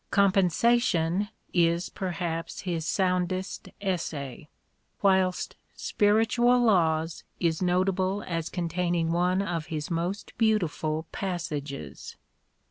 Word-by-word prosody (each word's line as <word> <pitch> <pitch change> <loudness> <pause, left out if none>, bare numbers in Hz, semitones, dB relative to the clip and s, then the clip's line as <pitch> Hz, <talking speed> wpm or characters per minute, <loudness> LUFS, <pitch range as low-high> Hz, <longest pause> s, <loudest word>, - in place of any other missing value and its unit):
" - - -45
Compensation 200 -1 +3
" - - -39 0.2
is 170 +1 -2
perhaps 170 -3 -3
his 170 -3 -2
soundest 185 0 -1
essay; 155 -8 -3 0.6
whilst 190 -2 +2
" - - -39
Spiritual 225 +4 +3
Laws 165 -6 +2
" - - -42
is 160 +1 -4
notable 185 +2 +1
as 165 -2 -2
containing 170 -1 0
one 180 +3 +2
of 170 -4 -3
his 155 -1 -4
most 175 +5 -3
beautiful 165 -8 +1
passages. 150 - -5
180 Hz, 110 wpm, -27 LUFS, 165-195 Hz, 0.6 s, Compensation